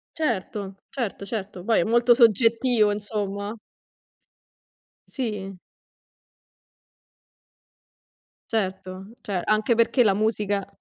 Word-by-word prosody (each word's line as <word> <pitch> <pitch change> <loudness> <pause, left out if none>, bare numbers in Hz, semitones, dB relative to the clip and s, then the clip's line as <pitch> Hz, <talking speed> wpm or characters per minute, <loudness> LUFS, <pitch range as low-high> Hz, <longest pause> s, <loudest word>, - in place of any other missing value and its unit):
Certo, 205 - -3
certo, 235 -7 -4
certo. 195 -4 -5
Poi 225 +2 +2
è - - +3
molto 240 +3 +4
soggettivo, 230 -1 +4
insomma. 205 0 -4 1.5
Sì. 205 -7 -5 2.9
Certo, 190 -1 -3
ce 190 -4 -3
anche 215 +2 +2
perché 235 +2 +3
la 200 -4 +3
musica 205 -2 0
210 Hz, 85 wpm, -24 LUFS, 195-230 Hz, 2.9 s, molto